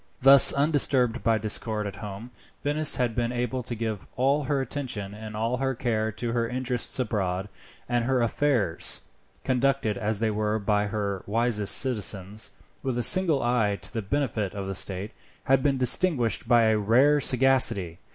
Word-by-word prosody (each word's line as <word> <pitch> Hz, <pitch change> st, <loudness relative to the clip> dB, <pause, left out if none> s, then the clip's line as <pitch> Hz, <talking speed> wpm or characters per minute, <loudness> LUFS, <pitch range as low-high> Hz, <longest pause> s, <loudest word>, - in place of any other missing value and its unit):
Thus, 135 Hz, +1 st, +9 dB
undisturbed 140 Hz, -4 st, +1 dB
by 115 Hz, -1 st, +1 dB
discord 110 Hz, 0 st, -1 dB
at 100 Hz, -, -7 dB
home, 105 Hz, +3 st, -9 dB, 0.3 s
Venice 150 Hz, +1 st, +3 dB
had 125 Hz, -2 st, -1 dB
been 120 Hz, +1 st, -2 dB
able 125 Hz, +1 st, -3 dB
to 120 Hz, 0 st, -7 dB
give 110 Hz, -3 st, -5 dB
all 140 Hz, +3 st, 0 dB
her 140 Hz, +1 st, -1 dB
attention 125 Hz, -8 st, -5 dB
and 105 Hz, 0 st, -9 dB
all 115 Hz, +3 st, -2 dB
her 135 Hz, 0 st, -2 dB
care 110 Hz, -2 st, -2 dB
to 115 Hz, +2 st, -4 dB
her 115 Hz, -1 st, -2 dB
interests 125 Hz, -1 st, -2 dB
abroad, 100 Hz, -5 st, -3 dB, 0.4 s
and 120 Hz, -1 st, -1 dB
her 130 Hz, 0 st, 0 dB
affairs, 115 Hz, -, -1 dB, 0.4 s
conducted 130 Hz, -4 st, -1 dB
as 110 Hz, 0 st, -2 dB
they 110 Hz, +1 st, -1 dB
were 105 Hz, 0 st, -1 dB
by 105 Hz, 0 st, -1 dB
her 100 Hz, -2 st, -4 dB
wisest 110 Hz, -1 st, +2 dB
citizens, 105 Hz, -5 st, 0 dB, 0.3 s
with 130 Hz, -2 st, -3 dB
a 120 Hz, -, -1 dB
single 170 Hz, -6 st, +4 dB
eye 110 Hz, -4 st, 0 dB
to -, -, -10 dB
the 115 Hz, -, -3 dB
benefit 110 Hz, -3 st, -3 dB
of 100 Hz, -1 st, -5 dB
the 95 Hz, -, -5 dB
state, 95 Hz, +2 st, -2 dB, 0.3 s
had 135 Hz, 0 st, +2 dB
been 140 Hz, 0 st, 0 dB
distinguished 125 Hz, -2 st, +2 dB
by 120 Hz, -1 st, +4 dB
a 110 Hz, -1 st, +2 dB
rare 130 Hz, +8 st, +3 dB
sagacity. 125 Hz, -, +2 dB
115 Hz, 170 wpm, -25 LUFS, 105-130 Hz, 0.4 s, Thus